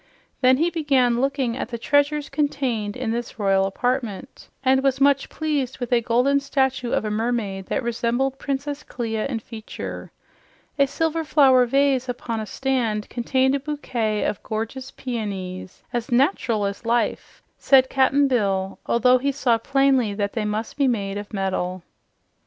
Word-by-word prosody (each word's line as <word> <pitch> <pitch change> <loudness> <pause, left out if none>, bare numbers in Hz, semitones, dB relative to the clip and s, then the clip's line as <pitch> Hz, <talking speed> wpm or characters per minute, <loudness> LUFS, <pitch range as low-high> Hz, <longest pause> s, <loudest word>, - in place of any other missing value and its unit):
Then 255 0 +5
he 335 +4 +1
began 265 -7 +2
looking 270 -3 0
at 250 - -4
the 235 - -4
treasures 285 +4 +1
contained 255 -8 -1
in 250 -3 -2
this 235 0 -4
royal 195 -2 +2
apartment, 245 +2 -3 0.2
and 265 0 +4
was 270 -1 +1
much 280 0 +3
pleased 290 -5 -2
with 245 -1 -3
a 240 - +4
golden 250 +5 +2
statue 265 -3 0
of - - 0
a 215 - -2
mermaid 210 -4 -2
that - - -1
resembled 240 +3 -1
Princess 285 +1 -3
Clia 225 -5 -3
in 260 -4 -2
feature. 220 0 -8 0.7
A 280 - +5
silver 325 +3 -1
flower 265 -5 +5
vase 270 0 +2
upon 235 -2 -3
a 215 - -5
stand 235 -6 -1
contained 260 +2 +1
a 280 - +1
bouquet 245 -7 -2
of 200 - -2
gorgeous 225 +4 -4
peonies, 195 -7 -5
"as 240 -1 -3
nat'ral 240 - +2
as 200 0 -4
life," 235 +1 -1 0.2
said 265 -2 +5
Cap'n 275 +2 +3
Bill, 195 -6 0
although 250 +2 +4
he 280 +2 0
saw 250 -4 +1
plainly 265 -4 +2
that 200 -1 -2
they 220 -2 -2
must 215 +4 -3
be 280 -2 +3
made 200 -4 -1
of 205 - -9
metal. 185 -3 -2
245 Hz, 160 wpm, -23 LUFS, 220-275 Hz, 0.7 s, Then